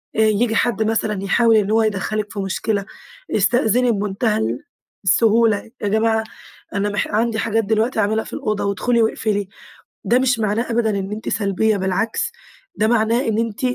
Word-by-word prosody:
آآ، - - -1
ييجي 220 +1 +2
حد 235 -1 +1
مثلًا 215 -2 -1
يحاول 225 +3 +3
إنّ 210 -1 +2
هو 225 +1 +3
يدخلِك 210 0 -2
في 205 - -5
مشكلة، 200 +1 -2 0.5
استأذني 245 0 +2
بمنتهى 210 +1 -1 0.6
السهولة، 220 +3 +3
يا 205 - -1
جماعة 220 +1 +1 0.5
أنا 200 +1 0
مح 205 - -1
عندي 225 +1 0
حاجات 225 0 0
دلوقتي 220 +3 0
أعملها 220 +1 +1
في - - -11
الأوضة، 215 -1 -2
وادخلي 235 +4 +1
واقفلي. 210 -2 -1 0.6
ده 245 - +3
مش 255 -2 +1
معناه 220 +3 -1
أبدًا 230 -1 +1
إن 195 +1 -4
أنتِ 215 +1 -5
سلبيّة 205 +1 +1
بالعكس، 190 +3 -1 0.4
ده 215 - +1
معناه 230 +2 +2
إن 220 -1 0
أنتِ 230 -2 -2
220 Hz, 160 wpm, -20 LUFS, 205-230 Hz, 0.6 s, يحاول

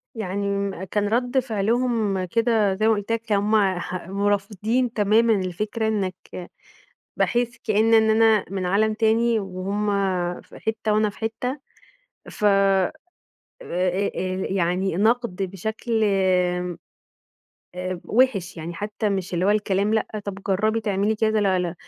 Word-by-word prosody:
يعني 200 -2 -2
م 200 -2 -2
كان 205 +2 -1
رد 245 +4 +1
فِعلهم 225 -3 0
كده 220 0 +2
زي 215 +3 +1
ما 225 - +5
قُلت 205 +1 -3
لك 230 -1 0
كانوا 205 -3 0
هُم 205 -4 +2
ح 180 0 -6
ورافضين 205 +4 0
تمامًا 220 +2 +3
الفكرة 210 +4 -2
إنك 190 -3 -4 0.7
باحس 240 -1 0
كإن 220 +1 +3
إن 220 -1 +5
أنا 220 -2 +4
من 190 -2 -2
عالم 215 +4 +2
تاني، 225 +1 +2
وهُم 195 +2 -3 0.6
في - - -15
حتة 220 -1 -2
وأنا 215 0 +2
في - - -17
حتة، 240 +5 -3 0.7
ف - - -6
آآ، 195 -2 +3 0.7
آآ، 185 - -1
آآ 185 0 -2
يعني 185 0 0
نَقد 225 +1 +1
بشكل 220 +4 -2
امم 180 -3 +1 1.0
آآ 180 -1 -4
وِحش، 210 -7 +1
يعني 165 +1 -6
حتى 210 +3 -3
مش 190 -2 -2
اللي 175 - 0
هو 200 - +4
الكلام 205 0 +1
لأ، 220 - +1 0.2
طَب 200 -2 -4
جرّبي 215 +4 +1
تعملي 205 0 0
كده 220 0 +1
لا 190 -2 +2
لا، 180 -1 -2
205 Hz, 145 wpm, -23 LUFS, 190-220 Hz, 1.0 s, ما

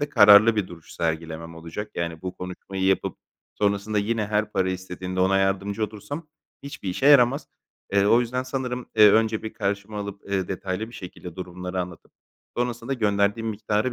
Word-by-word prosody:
de 145 - -1
kararlı 105 -2 +7
bir 100 -3 0
duruş 85 -2 -12
sergilemem 80 0 -3
olacak. 85 +6 -7
Yani 85 0 -3
bu 90 0 -5
konuşmayı 95 +1 -5
yapıp 95 0 +1 0.4
sonrasında 105 +1 0
yine 110 +1 0
her 105 0 0
para 95 -2 +1
istediğinde 95 0 -4
ona 95 +1 +3
yardımcı 100 +2 0
olursam 125 +10 -7 0.4
hiçbir 140 -8 -7
işe 110 +10 0
yaramaz. 140 0 +5 0.4
Eee, 100 0 +4
o 115 +3 +5
yüzden 125 +1 -1
sanırım, 130 -1 -4
eee, 105 -1 +9
önce 110 0 +2
bir 110 - -5
karşıma 100 +1 -3
alıp, 100 0 -6
eee, 95 -2 0
detaylı 95 +3 -3
bir 120 - -13
şekilde 90 -2 -9
durumları 90 0 -4
anlatıp 90 -2 -8 0.4
sonrasında 120 +1 -2
gönderdiğim 105 0 +1
miktarı 105 +3 -1
100 Hz, 170 wpm, -25 LUFS, 95-110 Hz, 0.4 s, eee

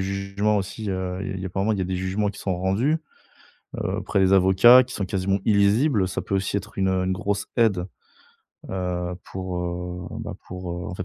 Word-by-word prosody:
jugements 100 +2 0
aussi, 100 +2 -3
heu, 95 -1 -3
il 95 0 -4
y - - -5
a - - -2
apparemment, 95 +4 0
il 105 - -2
y - - -1
a - - 0
des 90 +1 -2
jugements 95 +3 -1
qui 100 - -12
sont 95 -2 -2
rendus, 100 - +1 0.9
heu, - - -1
auprès - - -1
des 95 0 +4
avocats 95 +7 +7
qui 125 0 -10
sont 100 - -2
quasiment 95 +1 0
illisibles. 105 +2 +3
Ça 95 - -3
peut 100 - -2
aussi 95 +1 -1
être 100 +1 -5
une, 95 -1 +2
heu, 95 0 +1
une 95 - 0
grosse 100 +2 -2
aide, 100 -6 +2 0.8
heu, 90 -1 -2
pour, 95 -1 -5
heu, 90 0 -4
bah, - - -5
pour, 90 -1 -6
heu, 90 +2 -5
en - - -5
fait 95 - -5
95 Hz, 215 wpm, -24 LUFS, 90-100 Hz, 0.9 s, avocats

